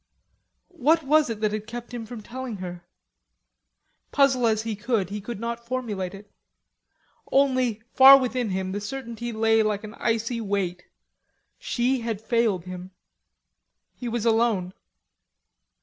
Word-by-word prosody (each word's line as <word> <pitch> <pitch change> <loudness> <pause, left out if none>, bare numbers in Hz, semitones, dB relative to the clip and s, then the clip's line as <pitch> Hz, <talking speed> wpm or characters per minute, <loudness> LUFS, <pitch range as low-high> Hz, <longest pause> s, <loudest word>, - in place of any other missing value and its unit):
What 315 +5 +3
was 300 0 +3
it 220 -2 -4
that 210 -1 +1
had 215 0 -4
kept 240 +1 -8
him 230 -2 -5
from 235 -1 -8
telling 255 0 -6
her? 175 -2 -7 1.3
Puzzle 265 -4 +3
as 220 -1 +1
he 225 -1 -3
would, 205 -7 +1
he 210 0 -4
could 220 +1 -6
not 235 +1 -4
formulate 210 -7 -3
it. 205 +1 -14 1.0
Only, 255 -5 +2
far 270 +1 +10
within 250 -3 -1
him, 190 0 -2
the 205 +2 -3
certainty 235 0 -5
lay 225 0 +3
like 215 -1 -1
an 215 0 -8
icy 230 +1 -1
weight: 195 -4 -2 0.7
she 250 +2 0
had 225 -3 -3
failed 220 -5 0
him. 180 0 -7 1.0
He 245 - -6
was 230 -1 -2
alone. 220 -5 +2
225 Hz, 140 wpm, -25 LUFS, 205-245 Hz, 1.3 s, far